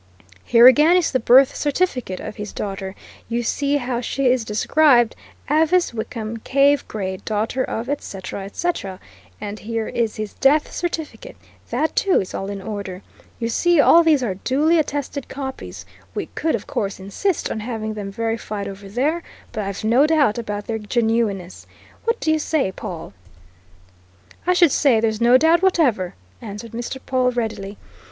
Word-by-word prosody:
Here, 235 Hz, 0 st, +6 dB
again, 300 Hz, +7 st, +7 dB
is 355 Hz, -, +1 dB
the 260 Hz, -, +1 dB
birth 255 Hz, +3 st, +5 dB
certificate 280 Hz, -, -1 dB
of -, -, -7 dB
his 210 Hz, 0 st, -6 dB
daughter. 195 Hz, -1 st, -5 dB, 0.3 s
You 240 Hz, +1 st, -1 dB
see 285 Hz, +4 st, 0 dB
how 245 Hz, -3 st, -2 dB
she 275 Hz, +2 st, -2 dB
is 250 Hz, -2 st, +1 dB
described 240 Hz, +3 st, +3 dB, 0.3 s
Avice 320 Hz, +2 st, +2 dB
Wickham 225 Hz, 0 st, -5 dB
Cave 280 Hz, +4 st, +2 dB
Gray, 190 Hz, -3 st, -4 dB
daughter 220 Hz, +6 st, -2 dB
of, 230 Hz, +2 st, -4 dB
et 285 Hz, +1 st, -2 dB
cetera, 195 Hz, 0 st, -7 dB
et 200 Hz, -, -11 dB
cetera. 200 Hz, -, -2 dB, 0.4 s
And 205 Hz, +1 st, -6 dB
here 225 Hz, 0 st, -3 dB
is 230 Hz, -2 st, -1 dB
his 215 Hz, -1 st, -5 dB
death 295 Hz, +3 st, +3 dB
certificate 345 Hz, +7 st, -5 dB, 0.3 s
that 315 Hz, -, -1 dB
too 385 Hz, -2 st, +3 dB
is 185 Hz, -, -5 dB
all 195 Hz, -, -4 dB
in 200 Hz, -1 st, -6 dB
order. 200 Hz, -3 st, -6 dB, 0.3 s
You 230 Hz, -, -2 dB
see, 345 Hz, +8 st, +2 dB
all 335 Hz, +3 st, +7 dB
these 305 Hz, -5 st, +3 dB
are 210 Hz, -6 st, -1 dB
duly 295 Hz, -, +2 dB
attested 285 Hz, -2 st, -3 dB
copies 260 Hz, -, -7 dB, 0.3 s
we -, -, -2 dB
could, 320 Hz, -3 st, 0 dB
of 210 Hz, -, -6 dB
course, 200 Hz, -2 st, -3 dB
insist 250 Hz, -, -2 dB
on -, -, -3 dB
having 220 Hz, -1 st, -4 dB
them 205 Hz, -2 st, -6 dB
verified 225 Hz, -1 st, -3 dB
over 195 Hz, 0 st, -9 dB
there, 285 Hz, -, 0 dB, 0.3 s
but 220 Hz, -3 st, -3 dB
I've 195 Hz, +1 st, -5 dB
no 245 Hz, +7 st, +4 dB
doubt 290 Hz, -8 st, +2 dB
about 205 Hz, -3 st, -4 dB
their 225 Hz, -1 st, -3 dB
genuineness 220 Hz, -4 st, -1 dB, 0.4 s
what 460 Hz, +1 st, 0 dB
do 315 Hz, -, +1 dB
you 315 Hz, -, +2 dB
say, 295 Hz, -9 st, 0 dB
Pawle?" 170 Hz, -, -7 dB, 1.3 s
"I 360 Hz, -, +5 dB
should 345 Hz, -4 st, +5 dB
say 255 Hz, -6 st, +3 dB
there's 220 Hz, 0 st, 0 dB
no 240 Hz, +2 st, +6 dB
doubt 325 Hz, +4 st, +4 dB
whatever," 270 Hz, -, +2 dB, 0.3 s
answered 210 Hz, +1 st, -8 dB
Mr. 240 Hz, +3 st, -5 dB
Pawle 255 Hz, -1 st, +2 dB
readily. 215 Hz, -4 st, -4 dB
235 Hz, 170 wpm, -21 LUFS, 210-290 Hz, 1.3 s, again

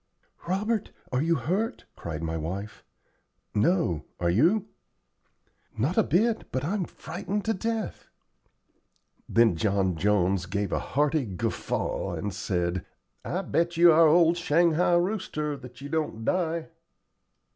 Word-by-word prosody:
"Robert, 210 Hz, +4 st, 0 dB, 0.2 s
are 125 Hz, +1 st, +1 dB
you 165 Hz, +2 st, +2 dB
hurt?" 185 Hz, -, -2 dB
cried 80 Hz, -1 st, -6 dB
my 80 Hz, 0 st, -2 dB
wife. 95 Hz, +7 st, -5 dB, 0.7 s
"No, 105 Hz, -, +1 dB
are 85 Hz, -1 st, +2 dB
you?" 175 Hz, -, +3 dB, 1.1 s
"Not 135 Hz, +11 st, 0 dB
a -, -, +5 dB
bit, 215 Hz, -, +1 dB
but 130 Hz, -, -2 dB
I'm 190 Hz, +2 st, -1 dB
frightened 195 Hz, +6 st, -5 dB
to 225 Hz, -, +2 dB
death." 225 Hz, +2 st, -3 dB, 1.2 s
Then 115 Hz, -5 st, +4 dB
John 95 Hz, 0 st, +1 dB
Jones 95 Hz, 0 st, +1 dB
gave 100 Hz, +1 st, -2 dB
a -, -, +1 dB
hearty 145 Hz, -1 st, 0 dB
guffaw 95 Hz, -3 st, -2 dB
and 100 Hz, -2 st, -4 dB
said: 90 Hz, -1 st, -1 dB, 0.4 s
"I 185 Hz, +3 st, -2 dB
bet 170 Hz, -1 st, 0 dB
you 170 Hz, 0 st, +8 dB
our 165 Hz, +1 st, +6 dB
old 170 Hz, +2 st, +5 dB
shanghai 170 Hz, +1 st, +3 dB
rooster 175 Hz, -5 st, -1 dB
that 125 Hz, 0 st, -12 dB
you 140 Hz, -, -7 dB
don't 150 Hz, -8 st, -2 dB
die." 170 Hz, -3 st, 0 dB
150 Hz, 130 wpm, -27 LUFS, -, 1.2 s, you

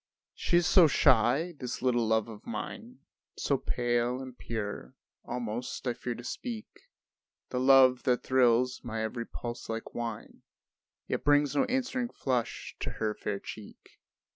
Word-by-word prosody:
She 175 Hz, -, +1 dB
is 175 Hz, -, +3 dB
so 170 Hz, 0 st, +7 dB
shy, 150 Hz, +4 st, +3 dB
this 125 Hz, -1 st, -5 dB
little 120 Hz, -3 st, +2 dB
love 110 Hz, 0 st, +2 dB
of 110 Hz, -2 st, -11 dB
mine, -, -, -6 dB, 0.4 s
So -, -, +1 dB
pale 120 Hz, +1 st, 0 dB
and 130 Hz, -2 st, -8 dB
pure, 105 Hz, -, -5 dB, 0.3 s
almost 120 Hz, +1 st, -4 dB
I 125 Hz, -, +1 dB
fear 120 Hz, 0 st, -4 dB
to 120 Hz, -, -9 dB
speak 225 Hz, -, -5 dB, 0.8 s
The 125 Hz, -, -2 dB
love 130 Hz, -1 st, +6 dB
that 125 Hz, -1 st, +2 dB
thrills 125 Hz, -1 st, +3 dB
my 110 Hz, -2 st, -3 dB
every 115 Hz, +1 st, -3 dB
pulse 120 Hz, -1 st, -6 dB
like 115 Hz, 0 st, -5 dB
wine 115 Hz, -2 st, -5 dB, 0.7 s
Yet -, -, -2 dB
brings 145 Hz, 0 st, +3 dB
no 270 Hz, -, +3 dB
answering 255 Hz, -1 st, -1 dB
flush 125 Hz, -, -2 dB
to -, -, -3 dB
her 110 Hz, -1 st, -1 dB
fair 100 Hz, -1 st, -3 dB
cheek. 105 Hz, 0 st, -11 dB
125 Hz, 150 wpm, -30 LUFS, 115-135 Hz, 0.8 s, so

